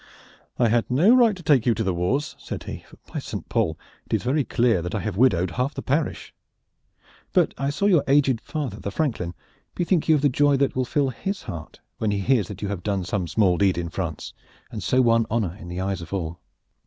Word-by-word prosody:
"I 120 -2 +3
had 115 +1 +1
no 170 - +5
right 235 -5 +5
to 180 - -12
take 140 -6 +3
you 115 - +4
to 110 - -1
the 95 -2 0
wars," 130 - -1
said - - -6
he; - - -7
"for - - -17 0.2
by - - -2
Saint - - -6
Paul! 80 0 0 0.3
it - - 0
is - - -2
very 140 +5 +1
clear 120 -7 +2
that 90 +5 -4
I - - 0
have 90 - -3
widowed 95 -6 +3
half 125 - -2
the - - -5
parish. 145 +3 -1 1.0
But - - +3
I 140 +1 -1
saw 145 +8 -1
your 180 -8 +4
aged 135 -4 +3
father 140 -10 -4
the - - -4
franklin. 100 - -2 0.4
Bethink 175 -2 +1
you 160 - +7
of 145 - +1
the 145 - +4
joy 145 +1 +3
that 140 0 +1
will 130 0 0
fill 140 +2 +1
his 190 - -4
heart 85 -7 -8 0.2
when 110 - 0
he 100 - 0
hears 115 -4 +2
that 105 0 -8
you - - -1
have 100 -4 -3
done 100 -1 -1
some 95 -2 -2
small 90 0 +2
deed 95 -3 +3
in 85 -1 -2
France, 85 -2 -5 0.4
and - - -5
so 130 0 +3
won 115 -1 +3
honor 105 -6 -1
in 85 - -10
the 90 +1 -5
eyes 95 -1 -2
of 85 - -10
all." 85 -3 -3
115 Hz, 235 wpm, -24 LUFS, 95-140 Hz, 1.0 s, you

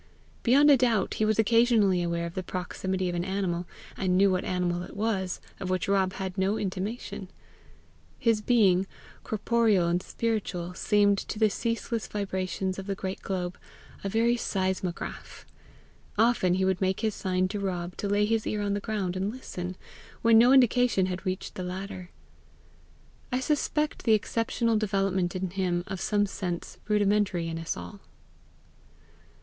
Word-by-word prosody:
Beyond 285 +5 +6
a 280 - +7
doubt 235 -6 +2
he - - +4
was 215 0 +2
occasionally 220 -4 +4
aware 170 0 -1
of 170 - -6
the 185 - -3
proximity 185 +1 -3
of 175 - -2
an 175 0 -1
animal, 180 -2 -2 0.3
and 185 -1 +1
knew 195 0 +5
what 185 0 0
animal 180 -1 -1
it 180 - -9
was, 200 -4 -1 0.2
of 185 - -4
which 185 +4 0
Rob 195 -1 +2
had 190 0 -4
no 195 +3 +1
intimation. 195 0 -4 0.9
His 225 -2 +2
being, 195 -5 +3 0.4
corporeal 220 -4 +2
and 175 +1 +1
spiritual, 195 -6 -2
seemed, 205 +1 +3
to - - -5
the 215 -1 +3
ceaseless 230 0 -2
vibrations 190 -1 -2
of 195 - -7
the 200 - -1
great 190 0 -5
globe, 180 -2 -3 0.4
a 195 - -1
very 230 +3 +2
seismograph. 190 -4 -3 0.7
Often 215 -5 +3
would 190 -1 +2
he - - -1
make 190 0 0
his 220 -2 0
sign 185 -1 0
to 205 +1 -3
Rob 180 -2 -3
to 200 - -2
lay 205 +1 +3
his 225 0 0
ear 210 -1 -1
on 200 -1 0
the 205 - 0
ground 200 -4 -2
and 190 +2 -1
listen, 185 -7 -6 0.5
when 230 0 +6
no 245 +2 +6
indication 245 -6 +4
had 185 0 -4
reached 185 +1 -3
the 185 - -5
latter. 185 0 -6 1.2
I 250 - +1
suspect 300 +1 0
the 225 - +3
exceptional 230 +1 +1
development 195 -4 0
in 185 -1 -2
him 180 -2 0
of 190 -2 -5
some 205 -1 +2
sense 180 -3 -5
rudimentary 205 -4 +2
in 165 0 -4
us 165 - -3
all. 205 - -8
195 Hz, 165 wpm, -28 LUFS, 185-220 Hz, 1.2 s, a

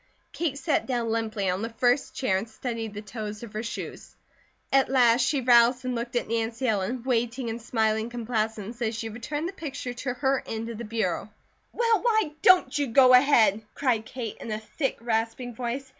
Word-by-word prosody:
Kate 315 -5 -2
sat 265 - 0
down 240 -3 -1
limply 220 -3 -1
on 185 +2 0
the 230 - -3
first 245 +3 +1
chair 255 -8 +1
and 215 +4 -5
studied 225 -2 -5
the 210 - -6
toes 210 +1 -6
of 230 -2 -9
her 215 - -3
shoes. 230 - -7 0.6
At 270 0 +4
last 245 -2 +4
she 270 +2 +1
roused 245 +1 +5
and 255 - -1
looked 235 +1 -4
at 240 - 0
Nancy 230 +3 -1
Ellen, 220 +3 -1
waiting 240 -1 -1
in 225 +1 -4
smiling 220 -1 0
complaisance 225 -1 -3
as 225 -1 -1
she 225 0 -4
returned 290 +8 -4
the 380 - -6
picture 285 -8 -5
to 250 0 -4
her 270 +1 +1
end 225 +1 -4
of 230 -1 -7
the 235 - -5
bureau. 215 -3 -2 0.4
"Well, 460 -4 +2
why 440 -9 +2
don't 370 -4 +5
you 290 -1 +1
go 255 +2 +6
ahead?" 245 -6 +5
cried 235 -5 0
Kate 235 -5 -6
in - - -7
a 215 - -1
thick, 265 +6 -3
rasping 230 +1 -2
voice. 250 +3 -4
235 Hz, 195 wpm, -26 LUFS, 225-260 Hz, 0.6 s, go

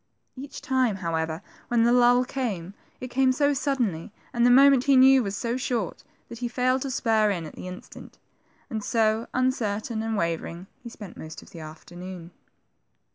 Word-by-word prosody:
Each 275 +1 -9
time, 255 -5 +1
however, 165 -1 -3 0.2
when 240 -2 +2
the 235 +1 +4
lull 245 0 +5
came, 205 -10 -4 0.3
it 255 - -6
came 260 +1 +3
so 285 +2 +2
suddenly, 245 - -1 0.2
and 235 - +1
the - - +5
moment, 270 0 +6
he 280 -1 +5
knew, 265 0 +7
was 200 -3 -3
so 235 +1 -2
short, 240 -7 -3 0.2
that 235 - -10
he 245 - -2
failed 255 +2 0
to 275 - -3
spur 220 -4 +2
in 175 -5 -2
at 155 - -9
the - - -9
instant; 185 0 -11 0.5
and 220 -5 -4
so, 220 0 +1
un 255 0 +2
certain 220 -2 -3
and 225 -1 -2
wavering, 170 0 -3 0.2
he 235 - -8
spent 210 -5 -11
most 160 0 -9
of - - -18
the 170 - -10
afternoon. 175 +3 -10
230 Hz, 185 wpm, -26 LUFS, 185-255 Hz, 0.5 s, knew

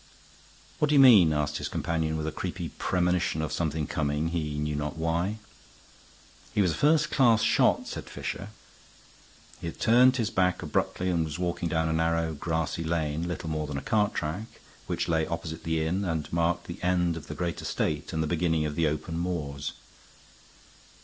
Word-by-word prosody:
"What 150 - +2
do 150 - +3
you - - +7
mean?" 110 -12 +8
asked 75 -1 0
his - - -3
companion, 80 -1 -1
with 80 - -3
a 80 - -2
creepy 85 +1 -4
premonition 90 0 0
of 75 - -3
something 80 -2 -1
coming, 75 +2 -1
he 75 -3 -2
knew 75 0 -1
not 75 +2 -3
why. 85 +6 0 1.2
"He 105 - +4
was 90 - +2
a - - -2
first 150 - +3
class 115 -5 +4
shot," - - +3
said - - -6
Fisher. 100 - -5 1.1
He - - -5
had 80 - -7
turned 125 +3 +5
his 115 -2 -1
back 90 -4 +1
abruptly 90 0 -1
and 85 -2 +1
was 80 0 -4
walking 85 -1 -2
down 80 0 +1
a 80 - 0
narrow, 80 0 +1
grassy 80 +1 -2
lane, 80 0 -1
little 90 -1 -4
more 75 -1 -2
than 70 -1 -4
a - - -3
cart 105 -1 +1
track, 85 +8 -3 0.4
which 85 -1 -1
lay 80 -2 +1
opposite 80 -1 -5
the 80 -1 0
inn 90 +5 0
and 80 -5 -3
marked 85 +1 +1
the 85 +2 -8
end 90 -2 +1
of 80 - -8
the - - -6
great 85 -1 -3
estate - - -2
and 80 0 0
the - - -1
beginning 80 -1 +1
of 75 - -2
the 80 0 +1
open 75 +2 -3
moors. 75 -6 -3
85 Hz, 190 wpm, -28 LUFS, 80-90 Hz, 1.2 s, mean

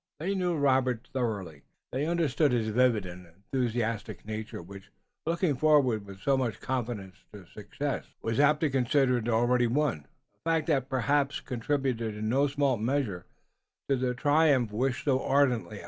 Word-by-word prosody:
They 185 +6 -1
knew 180 -3 0
Robert 130 -4 +1
thoroughly, 100 - -3 0.3
they 140 +4 -1
understood 160 -4 +1
his 115 -2 0
vivid 115 -3 +2
and 90 0 -9
enthusiastic 115 +5 -3
nature 110 0 -5
which, 100 +3 -11 0.4
looking 170 -2 +1
forward 130 -7 +3
with 100 -1 -10
so 140 +4 +2
much 125 -5 -2
confidence 115 -7 -4
to 100 -3 -11
success, 120 +10 -5 0.2
was 115 +2 -1
apt 150 +1 +4
to 155 -3 +1
consider 130 -1 +2
it 115 +1 -4
already 120 +2 +3
won, 120 - 0 0.4
a 165 - -2
fact 165 -2 +1
that 135 -4 +1
perhaps 140 +2 +1
contributed 125 -3 -2
in 110 +1 -3
no 140 +4 +3
small 140 -2 +1
measure 110 -6 -2 0.6
to - - +5
the 125 -1 -1
triumph 145 -3 +3
wished 125 +4 -1
so 135 -2 +2
ardently. 125 -7 +1
125 Hz, 160 wpm, -29 LUFS, 110-140 Hz, 0.6 s, to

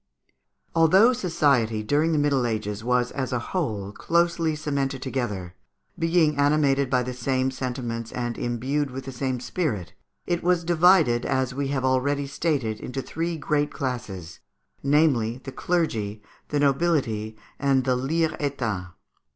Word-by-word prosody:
Although 190 +9 +6
society 140 - +1
during 150 +8 +2
the 155 - +2
Middle 140 -4 +2
Ages 110 -2 -3
was, 125 0 +1
as 130 -1 -3
a 125 - +1 0.2
whole, 110 - -2
closely 170 +4 +1
cemented 140 -3 -2
together, 105 -10 -3 0.5
being 165 -3 +3
animated 140 -2 +3
by 125 -1 +2
the 125 +1 -4
same 130 +1 0
sentiments 125 -3 -4
and 120 -1 -3
imbued 130 +5 -1
with 130 0 -7
the 135 - -5
same 130 0 -2
spirit, 120 - -3 0.3
it 175 -1 -1
was 175 -1 +2
divided, 165 -7 +4
as 130 -1 0
we 140 +1 -2
have 135 -1 -1
already 140 +2 +1
stated, 140 -6 -1
into 135 +1 -5
three 165 +1 -3
great 150 -1 0
classes, 105 - -5 0.4
namely, 140 -6 +2
the 135 - -6
clergy, 110 -13 -1 0.2
the 145 - -1
nobility, 135 -8 +1 0.2
and 135 -2 +2
the 130 -1 +2
_liers 155 +5 0
état. 115 -11 -2
135 Hz, 145 wpm, -25 LUFS, 120-155 Hz, 0.5 s, Although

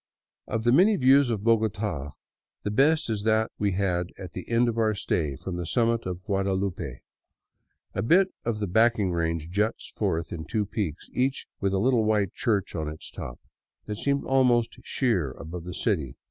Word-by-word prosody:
Of 110 -1 -2
the 120 - +4
many 190 - +6
views 135 -2 +5
of 110 -4 -2
Bogota 105 -10 0 0.5
the 105 - -1
best 155 +7 +3
is 110 -3 -1
that 110 +1 +2
we 100 -2 +1
had 90 -2 0
at 95 -2 -8
the 90 - -8
end 120 +1 +3
of 115 -1 -1
our 110 -1 +2
stay, 75 -7 -1
from 90 +6 -5
the 90 - -3
summit 115 0 +1
of 90 0 -5
Guadalupe. 95 -2 -2 0.9
A - - -1
bit 185 +10 +4
of 115 -2 -1
the 105 - -1
backing 110 0 +3
range 85 -1 -1
juts 105 +4 -1
forth 80 +1 -1
in 80 -2 -5
two 110 -3 -1
peaks, 95 -6 -4
each 130 +2 0
with 100 -1 0
a 95 - +1
little 120 +2 +3
white 105 -3 +1
church 105 -5 0
on 80 -2 -2
its 75 +1 -9
top, - - -7 0.5
that 105 -1 -4
seem 140 0 0
almost 125 -3 +2
sheer 100 - 0
above 85 +1 -8
the 90 - -6
city. 80 - -1
105 Hz, 185 wpm, -27 LUFS, 90-115 Hz, 0.9 s, many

